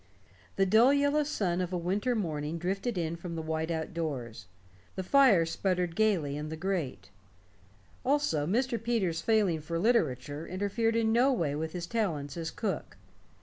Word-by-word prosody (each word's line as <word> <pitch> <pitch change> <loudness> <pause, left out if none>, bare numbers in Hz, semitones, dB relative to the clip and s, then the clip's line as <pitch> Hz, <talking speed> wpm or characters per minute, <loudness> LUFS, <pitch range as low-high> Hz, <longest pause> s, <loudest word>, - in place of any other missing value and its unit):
The 195 - +3
dull 220 +7 +6
yellow 285 +1 +3
sun 195 - -1
of 180 0 -3
a 180 - -1
winter 200 +8 0
morning 155 -6 -2
drifted 195 +6 -2
in 165 -1 -1
from 170 0 -7
the 165 - -3
white 160 +1 -2
outdoors; 155 - -4 0.5
the 190 - -3
fire 225 -7 +5
sputtered 180 0 -1
gaily 180 -10 +1
in 150 +1 -5
the 160 - -5
grate. 155 - -3 0.9
Also, 255 - +1
Mr. 235 +4 0
Peters' 200 -8 0
failing 200 -8 +2
for 165 +2 -3
literature 155 - 0
interfered 205 +4 0
in 225 -1 +2
no 250 +4 +4
way 165 - 0
with 160 +1 -4
his 175 -1 -4
talents 165 -10 -2
as 165 -1 -3
cook. - - -4
180 Hz, 160 wpm, -30 LUFS, 160-220 Hz, 0.9 s, dull